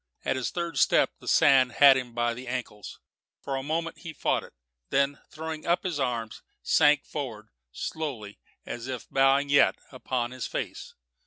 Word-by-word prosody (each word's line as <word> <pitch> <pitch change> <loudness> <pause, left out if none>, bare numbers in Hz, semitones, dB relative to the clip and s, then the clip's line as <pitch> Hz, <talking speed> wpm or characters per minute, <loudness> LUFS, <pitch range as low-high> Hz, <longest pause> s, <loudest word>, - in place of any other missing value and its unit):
At - - +1
his 130 -2 -2
third 170 -5 -3
step - - +4
the - - -14
sand 130 -3 +5
had 140 +2 +7
him 125 -3 -4
by 120 0 +1
the 125 +2 -9
ankles. 120 -5 -6 0.4
For 135 - -4
a 135 - -2
moment 165 +3 -3
he 165 -3 -8
fought - - 0
it, - - -14 0.4
then, 140 +1 +1
throwing 160 0 -6
up 175 +1 +2
his 175 -6 -2
arms, 120 -4 -2 0.2
sank 145 -1 +4
forward, 115 -7 -6 0.2
slowly 120 - -5 0.3
and - - -5
as 120 +1 -8
if 130 -3 -5
bowing 135 +1 +3
yet, 145 - +5 0.2
upon 125 -2 -3
his 130 -1 -5
face. - - -5
135 Hz, 175 wpm, -27 LUFS, 120-150 Hz, 0.4 s, had